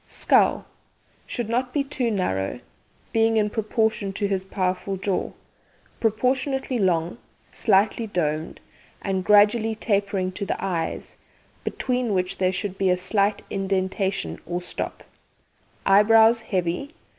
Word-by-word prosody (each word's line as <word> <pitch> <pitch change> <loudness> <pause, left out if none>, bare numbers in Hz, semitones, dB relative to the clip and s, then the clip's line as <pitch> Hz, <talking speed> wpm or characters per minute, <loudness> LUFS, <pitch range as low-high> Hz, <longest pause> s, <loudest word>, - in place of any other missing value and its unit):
SKULL - - +2 0.6
Should 240 -3 -3
not 250 +2 -1
be 285 - +2
too 270 -4 -1
narrow, 100 - -1 0.5
being 225 0 +3
in 210 -1 +1
proportion 220 -2 0
to 200 +1 -1
his 195 -2 -1
powerful 190 0 -2
jaw, 190 0 -2 0.7
proportionately 260 +3 0
long, 175 +1 0 0.3
slightly 215 +2 +2
domed, 155 -5 -2 0.4
and 190 -2 -1
gradually 210 +2 +4
tapering 200 -3 0
to 200 - -5
the - - -2
eyes, 170 -4 -3 0.5
between 250 -5 -1
which 185 +1 -1
there 185 -1 +2
should 195 +1 -4
be 195 -1 +2
a 180 - +3
slight 200 +2 0
indentation 190 - -1
or 175 +1 -2
stop. 180 - -6 0.8
Eyebrows 225 +3 +6
heavy. 185 - -2
200 Hz, 120 wpm, -24 LUFS, 185-225 Hz, 0.8 s, Eyebrows